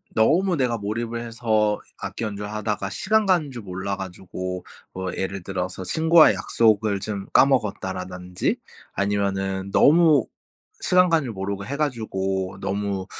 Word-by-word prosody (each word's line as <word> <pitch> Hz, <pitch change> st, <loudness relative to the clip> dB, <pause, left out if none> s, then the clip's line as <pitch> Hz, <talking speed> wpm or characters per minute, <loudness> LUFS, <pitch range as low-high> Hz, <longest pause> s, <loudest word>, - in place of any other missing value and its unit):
너무 175 Hz, -, +3 dB
내가 125 Hz, -4 st, +1 dB
몰입을 115 Hz, +3 st, -3 dB
해서 110 Hz, -2 st, +1 dB, 0.2 s
악기 -, -, -5 dB
연주하다가 105 Hz, -1 st, -3 dB
시간 220 Hz, -, +1 dB
가는 170 Hz, -7 st, +2 dB
줄 120 Hz, -3 st, -7 dB
몰라 95 Hz, +1 st, -4 dB
가지고 95 Hz, -1 st, -6 dB, 0.3 s
뭐 95 Hz, 0 st, -4 dB
예를 95 Hz, -1 st, -3 dB
들어서 95 Hz, -1 st, -4 dB
친구와의 160 Hz, -, +5 dB
약속을 105 Hz, 0 st, +2 dB
좀 100 Hz, -2 st, -4 dB
까먹었다라든지 95 Hz, -8 st, +1 dB, 0.4 s
아니면은 100 Hz, -1 st, -1 dB
너무 155 Hz, -, +5 dB, 0.6 s
시간 180 Hz, 0 st, +4 dB
가는 165 Hz, -3 st, +2 dB
줄 120 Hz, -, -5 dB
모르고 100 Hz, 0 st, -4 dB
해 140 Hz, +5 st, -4 dB
가지고 95 Hz, -9 st, -2 dB
너무 100 Hz, -1 st, -2 dB
105 Hz, 305 characters per minute, -24 LUFS, 95-125 Hz, 0.6 s, 친구와의